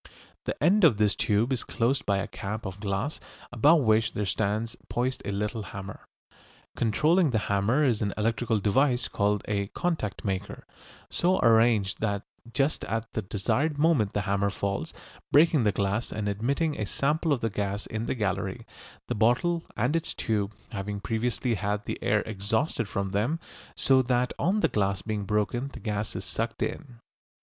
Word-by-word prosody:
The - - -3
end 195 +6 +4
of 140 -11 +6
this 105 -1 +3
tube 110 +5 +1
is 125 - -1
closed 125 +4 0
by 100 -1 +3
a 100 - -2
cap 110 +3 -5
of 95 0 -6
glass 105 +8 -2 0.3
above 145 +7 +5
which 110 -2 +3
there 105 - -1
stands 110 +3 -1
poised 130 +2 -1
a - - -3
little 105 +2 -2
hammer. 100 -1 -8 0.7
Controlling 155 - +3
the 120 - +1
hammer 105 +9 +2
is 120 -6 +2
an 100 -2 0
electrical 115 +1 +1
device 125 +5 +2
called 100 0 0
a 100 -1 -1
"contact 160 - -2
maker," 95 0 -3 0.5
so 180 +2 +2
arranged 110 -4 +4
that 100 -2 -1 0.3
just 135 +4 0
at 115 +2 -3
the 110 - -1
desired 130 - 0
moment 145 -10 +3
the 105 - 0
hammer 100 0 +1
falls, 100 0 -3 0.4
breaking 150 -4 +5
the 105 - +4
glass, 100 +4 -1
and 105 -1 -3
admitting 140 - 0
a 105 - -1
sample 150 - 0
of 140 - +1
the 115 - -1
gas 100 0 -2
in 110 +1 -4
the - - -1
gallery, 100 -3 -2 0.4
the - - -1
bottle 125 - +2 0.2
and 125 +8 +1
its 165 - -1
tube 105 -1 -1 0.2
having 100 -1 -4
previously 115 +3 -1
had 105 0 -2
the - - -4
air 105 0 +2
exhausted 110 +4 -1
from 100 -1 -2
them, 115 +11 0 0.4
so 130 -1 +4
that 125 0 +1
on 200 +4 +2
the - - +4
glass 100 -2 0
being 105 -2 -3
broken 105 +5 0
the 140 - -10
gas 105 -1 -3
is 95 - -4
sucked 115 +6 -2
in. 130 -7 -5
110 Hz, 175 wpm, -27 LUFS, 100-130 Hz, 0.7 s, of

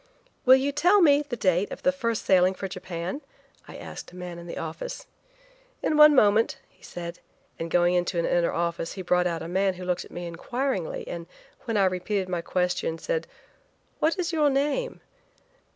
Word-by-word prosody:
"Will 260 0 +9
you 270 +2 +1
tell 355 +8 +4
me 290 -5 +5
the 285 -4 -5
date 190 -3 +1
of - - -8
the 275 - +4
first 230 -5 -2
sailing 185 0 +4
for 195 - -4
Japan?" 185 - -5 0.5
I - - -10
asked - - -9
a - - -15
man 180 -1 -7
in 170 - -10
the - - -6
office. 165 0 -6 0.8
"In 310 - +1
one 300 0 +8
moment," 215 -2 +4
he - - -32
said, 170 -1 -7 0.4
and 165 - -4
going 175 +1 +3
into 175 0 0
an 170 - +1
inner 175 -1 +2
office 170 0 -2
he 190 - -6
brought 180 0 +2
out 165 -2 -3
a - - -6
man 190 +2 +1
who 180 0 -8
looked 180 0 -1
at - - -14
me 175 0 -6
inquiringly, 195 - -3
and 170 -1 -6 0.4
when 230 -2 -1
I 195 - +4
repeated 185 +1 -1
my 175 -2 -1
question, 180 -2 -1
said: 480 - -2 0.7
"What 325 +5 +2
is 355 -1 -2
your 300 -2 +3
name?" 295 - -1
185 Hz, 195 wpm, -26 LUFS, 175-270 Hz, 0.8 s, Will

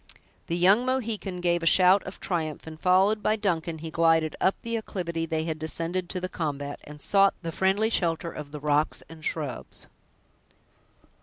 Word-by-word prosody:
The 170 - -1
young 195 +7 +5
Mohican 220 -8 -2
gave 175 -1 +1
a 165 - 0
shout 185 +3 +6
of 185 - -8
triumph, 160 -5 -3
and 160 -1 -9
followed 190 +4 +3
by 215 - +2
Duncan, 170 -6 -1
he 160 +1 -7
glided 165 -1 +2
up 190 - +3
the 230 0 -2
acclivity 170 -7 -3
they 160 0 -1
had 160 -1 -3
descended 165 +3 -2
to 185 - -1
the 185 - -3
combat, 145 -5 -4
and 150 0 -11
sought 195 +4 +4
the 165 - -3
friendly 195 +6 +1
shelter 170 -4 0
of 145 -2 -8
the 150 - -6
rocks 150 +1 0
and 160 -1 -12
shrubs. 145 -6 -4
170 Hz, 175 wpm, -27 LUFS, 160-190 Hz, -, shout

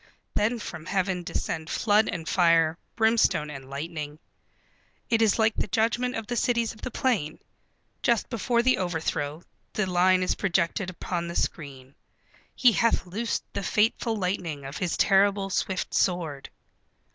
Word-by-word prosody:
Then 220 +4 +1
from 165 -7 -7
Heaven 190 -2 0
descend 160 -2 -4
flood 215 0 +2
and 165 -2 -5
fire, 165 -3 +4 0.2
brimstone 220 -9 +2
and 135 -2 -9
lightning. 150 +1 -5 0.9
It 230 -1 +3
is 215 -3 +4
like 220 -1 +3
the - - -1
judgment 235 +5 0
of 225 - -4
the 240 - -3
Cities 235 -1 +1
of 220 - -17
the 255 - -4
Plain. 220 - -1 0.6
Just 235 -3 +2
before 235 +1 0
the 255 -5 +3
overthrow, 160 -3 -2 0.3
the 215 - 0
line 185 0 +3
is 185 - +1
projected 190 0 0
upon 170 -1 -4
the 170 - -6
screen: 135 -4 -4 0.6
"He 250 -3 +5
hath 230 -2 +2
loosed 210 +5 -2
the 200 - -2
fateful 220 +3 +1
lightning 180 -7 -3
of 135 +2 -6
his 180 -2 -1
terrible 195 0 +3
swift 185 0 -2
sword." 165 -7 0
185 Hz, 150 wpm, -26 LUFS, 165-220 Hz, 0.9 s, He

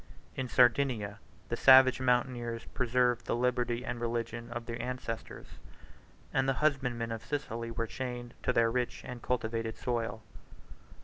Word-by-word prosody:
In 130 -1 -3
Sardinia, 120 -5 +3 0.3
the - - 0
savage 130 -1 +7
mountaineers 120 -2 0
preserved 125 -1 +1
the - - +1
liberty 125 0 0
and 120 -1 -4
religion 115 0 -3
of 120 0 -5
their 115 0 -4
ancestors; 125 -3 -5 0.9
and 135 0 +2
the - - +3
husbandmen 130 -5 0
of 115 -1 -5
Sicily 115 -6 -4
were 115 0 -2
chained 120 0 -5
to - - +1
their 115 -2 +3
rich 125 -1 -2
and 125 -1 -7
cultivated 115 -2 -2
soil. 115 -2 -2
120 Hz, 140 wpm, -31 LUFS, 115-125 Hz, 0.9 s, savage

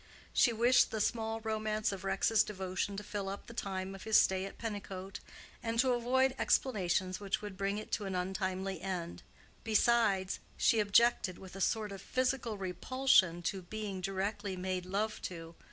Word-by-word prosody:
She 240 - +5
wished 240 +2 +4
the 220 - -3
small 225 +1 -1
romance 215 -1 -1
of 195 -1 -6
Rex's 195 +3 +3
devotion 190 0 -3
to 205 - -4
fill 200 -1 -4
up 200 - -6
the 235 - -10
time 190 -3 -3
of 195 - -9
his 220 -1 +4
stay 190 0 +2
at 195 - -9
Pennicote, 195 -4 -5 0.4
and 230 -1 -2
to 255 +1 +4
avoid 255 +2 +2
explanations 185 -6 +1
which 205 +1 -2
would 205 -2 -6
bring 200 +1 -1
it 215 - -7
to 210 - -1
an 190 -1 -3
untimely 190 0 -2
end. 180 -2 -4 0.4
Besides, 215 -4 +2 0.2
she 225 - +4
objected, 205 -2 +3
with 190 -1 -11
a 195 - -6
sort 215 +1 0
of 195 -2 -7
physical 255 -3 -1
repulsion, 190 -1 +2
to 190 +2 -2
being 200 0 -5
directly 195 +1 -2
made 185 0 -3
love 210 +3 -1
to. 165 -2 -6
200 Hz, 170 wpm, -33 LUFS, 190-220 Hz, 0.4 s, She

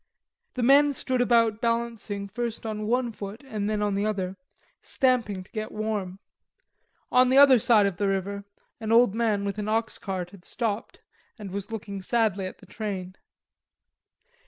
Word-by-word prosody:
The 250 - -1
men 285 +3 +6
stood 255 -1 -1
about 230 -2 +3
balancing 230 -4 -2
first 230 +3 -4
on 215 -1 -3
one 245 +1 +1
foot 210 +4 -8
and 215 -5 -3
then 210 -1 0
on 205 -1 0
the 200 +1 0
other, 195 -3 -2 0.5
stamping 240 -8 0
to - - -24
get 215 -1 -4
warm. 210 -4 -3 0.9
On 250 0 +5
the 260 - +4
other 275 -3 +8
side 215 -2 +5
of 195 -3 -1
the 200 - 0
river 195 +1 -2 0.4
an 220 -1 -3
old 230 -3 +5
man 215 -3 0
with 200 +1 -3
an 210 - -3
oxcart 195 -5 -2
had 195 -3 -15
stopped 225 -1 -3 0.4
and 205 -4 -8
was 200 +3 -5
looking 200 -3 -5
sadly 205 -3 0
at - - -9
the - - -17
train. 190 -4 -5
215 Hz, 165 wpm, -26 LUFS, 200-235 Hz, 0.9 s, other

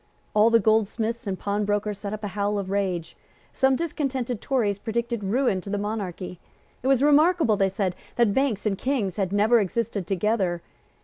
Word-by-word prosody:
All 215 +2 +5
the 230 0 +5
goldsmiths 220 +1 0
and 190 -1 -2
pawnbrokers 205 0 -1
set 200 -1 -5
up 215 0 -6
a 205 - -2
howl 205 +1 -1
of 195 -1 -4
rage. 185 -4 -2 0.4
Some 265 0 +3
discontented 265 -7 -2
Tories 215 -7 0
predicted 235 0 -2
ruin 205 -1 +1
to 200 - -9
the 205 - -1
monarchy. 200 -4 -4 0.4
It 255 - -3
was 270 -1 +3
remarkable, 300 -4 +4
they 195 -1 +2
said, 190 -1 -2 0.2
that 235 -4 +3
Banks 265 -6 0
and 205 -2 +1
Kings 230 -9 -1
had 190 -3 -1
never 215 +4 +4
existed 205 -1 -2
together. 190 -3 0
210 Hz, 175 wpm, -25 LUFS, 200-235 Hz, 0.4 s, All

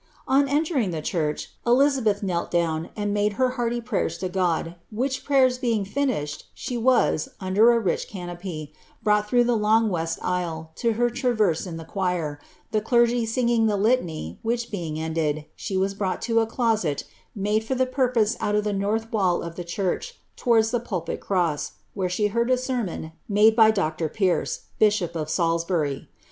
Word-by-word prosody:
On 275 +1 +3
entering 290 - +1
the 160 -3 -4
church, 150 -3 -2
Elizabeth 245 -5 +3
knelt 175 -3 -1
down 165 -2 0
and 205 -1 -1
made 205 0 +1
her 255 +4 +2
hearty 240 -1 -1
pftyers 225 -8 -2
to 185 - -1
Qod, 175 -3 0 0.2
which 260 +4 -2
prayers 260 -3 +3
being 230 -6 0
finished, 200 - -2
she 250 - -5
was, 235 -9 +2
under 200 +5 +4
a 235 - +3
rich 190 -7 -1
eanopy, 175 -5 -6 0.3
brought 210 0 +2
through 245 0 +4
the 240 0 +2
long 220 +1 +3
west 165 -3 -2
aisle, 165 -3 -2
to 230 -1 +1
her 240 +2 +1
traverse 220 - +1
in 165 -2 -6
the 165 - -8
choir, 175 -5 -2 0.3
the 215 - +1
clergy 235 +1 +2
singing 235 -1 +2
the 210 -1 +1
litany, 180 - 0
which 235 +1 -2
being 165 -6 -4
ended, 160 -2 -1
she 195 -3 -3
was 195 +1 +1
brought 195 -2 -2
to 230 -1 +2
a 225 - +1
doMt 220 - 0 0.3
iwule 210 +2 +1
for 225 +4 -2
the 260 0 +2
purpose 250 -4 +1
out 210 - 0
of 210 - +2
the 210 -1 -1
north 215 +3 -1
wall 185 -5 +1
of 170 0 -6
the 175 - -5
church, 190 - -3 0.2
towards 225 -3 +3
die 240 - +1
pulfnt 185 -8 -4
cross, 175 -6 -1 0.2
where 190 -3 -1
she 195 +4 0
heard 235 +4 +1
a 255 - +4
sermon 245 -11 -3 0.2
made 215 +2 +5
by 220 -2 +7
Dr. 160 -6 0
Pierce, 190 -1 0 0.2
bishop 205 -5 +2
of 155 -2 -3
Salisbury. 165 -3 0
210 Hz, 180 wpm, -24 LUFS, 175-235 Hz, 0.3 s, by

